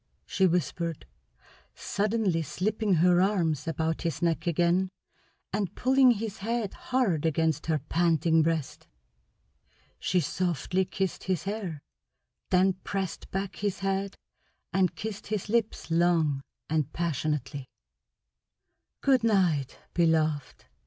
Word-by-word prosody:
she 190 -1 +2
whispered, 170 -2 -1 0.7
suddenly 205 -5 0
slipping 205 - 0
her 175 +2 +4
arms 165 -7 +1
about 160 0 -1
his 165 -2 -2
neck 170 0 0
again 175 +3 +2 0.6
and 200 -2 -2
pulling 260 0 +5
his 220 -2 -1
head 225 0 -2
hard 230 - 0
against 160 -1 +1
her 160 -2 +2
panting 165 +2 +2
breast. 160 -3 -2 1.1
She 180 - +1
softly 180 +3 0
kissed 190 0 -3
his 185 -5 0
hair, 195 -7 -4 0.7
then 185 +1 +4
pressed 195 -3 -4
back 195 -2 -3
his 205 -2 -2
head 195 0 -1 0.6
and 185 -1 +2
kissed 215 -2 -6
his 210 -1 -3
lips 225 -6 0
long 165 -4 +2 0.3
and 155 -2 0
passionately. 145 -5 -2 1.3
"Good 265 -4 +3
night, 180 - +2 0.2
beloved!" 155 -5 +1
175 Hz, 110 wpm, -28 LUFS, 160-195 Hz, 1.3 s, pulling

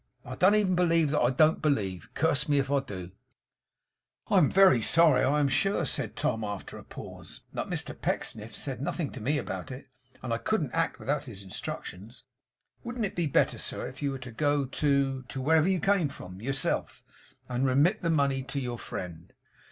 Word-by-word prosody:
I 130 - -6
don't 185 +9 +4
even 205 -3 +2
believe 165 -4 +3
that 150 - +2
I 120 - +4
DON'T 155 +4 +3
believe, 95 - -1
curse 150 -1 +1
me 145 - +4
if 135 0 0
I 140 - +4
do!' 95 -9 -7 1.2
'I - - +2
am 145 - +4
very 190 -11 +6
sorry, 165 +6 +5
I 145 +3 +3
am 145 - +3
sure,' 170 +6 +1
said - - -3
Tom 115 -2 -1
after 105 -2 -5
a - - -12
pause, - - -10
'but - - -3
Mr - - -3
Pecksniff 110 0 -3
said 135 -3 -4
nothing 145 +1 -2
to 130 - -8
me 145 +7 +1
about - - -4
it, 130 0 -9 0.3
and 120 -2 -2
I 115 - -1
couldn't 160 - -1
act 165 0 0
without 145 +1 -2
his 105 -6 -9
instructions. 100 +4 -7 0.6
Wouldn't 240 -2 -2
it 195 - -5
be 170 -2 0
better, 145 - +2
sir, - - -3
if 135 - -10
you 140 - 0
were 135 - -3
to 125 -1 -9
go 145 +3 +1
to 140 -1 +1
to 130 +1 -7
wherever 160 +5 +3
you 190 -2 +2
came 195 -3 +2
from 95 -8 -10
yourself, 135 +3 -2 0.4
and 125 +1 -1
remit 145 +11 +3
the 170 - 0
money 140 -4 +2
to 130 +2 -4
your 120 -3 -4
friend? 85 -2 -7
140 Hz, 200 wpm, -29 LUFS, 125-160 Hz, 1.2 s, very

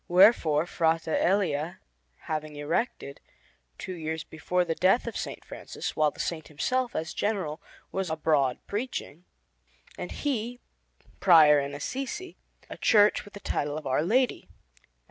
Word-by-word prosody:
Wherefore, 175 -5 +5
Frate 165 -1 +1
Elia 170 -2 +1 0.5
having 155 -1 -4
erected, 145 - -2 0.6
two 185 - -6
years 160 -2 -4
before 180 +3 -1
the 165 - 0
death 185 +8 +3
of 235 - -4
S. - - -3 0.2
Francis - - -6
(while 155 -1 +3
the - - -17
Saint 160 -3 -3
himself, 245 - -1
as 160 +1 -3
General, 190 -7 -2 0.3
was 190 -2 -2
abroad 155 -4 +1
preaching, 205 - -5 0.7
and - - -5
he, 245 -4 -2 0.6
Prior 155 -5 +7
in 140 0 -4
Assisi), 270 - -5 0.3
a - - -8
church 210 0 +4
with 205 - -14
the - - -7
title 145 -6 -2
of 155 - -7
Our 130 +1 +1
Lady, 245 +10 +1
and - - -24
S. - - -34
165 Hz, 145 wpm, -28 LUFS, 155-205 Hz, 0.7 s, Prior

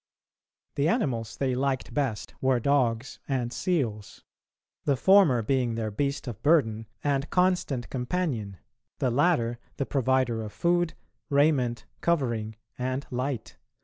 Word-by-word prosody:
The 140 +2 +1
animals 130 - -1
they 130 -2 0
liked 130 +1 -1
best 135 -8 -2
were 130 -2 +3
dogs 125 -2 +1
and 125 -3 -1
seals; 120 - -2 0.6
the 140 -2 +2
former 180 - +5
being 125 -1 +1
their 110 -1 -2
beast 140 +5 -2
of 115 -3 -6
burden 115 -9 +2 0.2
and 140 0 0
constant 180 -9 +1
companion, 125 - -2 0.4
the 130 - +1
latter 120 -4 +2 0.2
the 140 - -1
provider 130 -4 +1
of 105 -1 -7
food, 175 -1 +1 0.3
raiment, 140 -5 +2 0.2
covering, 120 -10 0 0.2
and 130 +2 -2
light. 125 -1 -3
130 Hz, 125 wpm, -27 LUFS, 115-145 Hz, 0.6 s, former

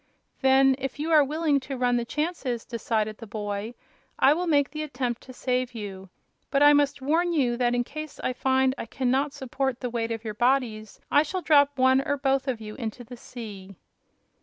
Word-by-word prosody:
"Then, 265 0 +5
if 270 +2 -4
you 315 +3 -2
are 305 -2 +7
willing 300 0 +1
to 265 0 -6
run 245 -1 +2
the 240 - -2
chances," 295 -5 -3
decided 220 -2 -2
the 225 - -9
boy, 205 +2 -4 0.4
"I 275 - +5
will 350 +3 -2
make 285 -3 +2
the 305 - -5
attempt 250 -5 -3
to 260 - -12
save 250 -1 -2
you. 195 -3 -7 0.4
But 275 0 +3
I 290 0 +8
must 285 -1 +1
warn 340 +5 +1
you 255 -6 +2
that 245 -1 +1
in 245 - +1
case 305 +3 -8
I 255 - 0
find 260 +1 +2
I - - -5
can 255 -2 -1
not 275 +3 +1
support 265 -1 -3
the 250 -2 -4
weight 230 -1 -2
of 225 -1 -4
your 215 - -3
bodies 235 -2 0
I 290 - +6
shall 355 +4 -3
drop 285 -2 +4
one 260 +1 +4
or 285 +1 -1
both 270 -1 0
of 250 -4 -1
you 215 -1 -8
into 235 0 -6
the 245 +1 -10
sea." 205 -6 -9
260 Hz, 210 wpm, -26 LUFS, 235-285 Hz, 0.4 s, I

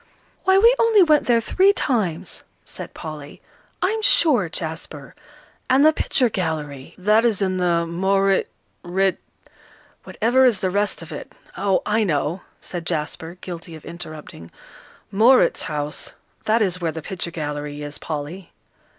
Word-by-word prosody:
"Why, 380 0 +5
we 460 +5 +6
only 450 -4 +5
went 305 -3 +3
there 235 -1 +4
three 385 - +3
times," 215 - -2 0.2
said - - -9
Polly, 150 -2 -8 0.4
"I'm 440 +4 0
sure, 265 - +4
Jasper. 160 -3 -6 0.6
And 265 +3 +5
the 310 - +6
picture 260 -4 +1
gallery 155 - -4
" - - -33
"That 215 +2 +5
is 230 -5 +2
in 190 -2 0
the 170 -2 +1
Maurit 195 +3 +1 0.3
rit, 190 +1 0 0.8
whatever 245 +4 +2
is 235 -7 +3
the 185 - 0
rest 205 +2 -1
of - - -11
it? - - -8 0.2
Oh, 195 -1 +1
I 215 +1 +2
know," 160 0 -1 0.2
said 175 -2 -7
Jasper, 160 +1 -4
guilty 170 -2 -8
of 155 - -13
interrupting, 155 - -9 0.6
"Mauritshuis, 185 - +2 0.3
that 220 +1 +3
is 180 -2 -2
where 165 -2 0
the 160 -1 -7
picture 180 -1 -4
gallery 150 -2 -5
is, 145 0 -7
Polly." 160 +4 -6
185 Hz, 145 wpm, -22 LUFS, 160-225 Hz, 0.8 s, we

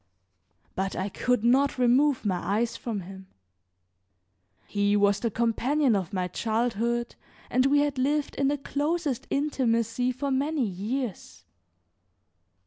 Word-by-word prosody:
But 190 0 -2
I 190 +2 -2
could 250 +3 0
not 265 +4 +3
remove 255 +2 +3
my 190 -3 +1
eyes 225 +6 -1
from 220 -5 -4
him. 190 +1 -11 1.4
He 205 0 +1
was 205 0 +3
the 230 - -1
companion 240 +4 +1
of 190 -1 -2
my 185 -2 -1
childhood 235 +3 -1 0.4
and 255 +2 +3
we 285 +1 +4
had 290 -2 -1
lived 290 +3 0
in 275 - 0
the 290 +1 +1
closest 290 0 -2
intimacy 250 -4 0
for 270 +3 -3
many 280 +1 0
years. 200 - -4
240 Hz, 130 wpm, -27 LUFS, 205-275 Hz, 1.4 s, we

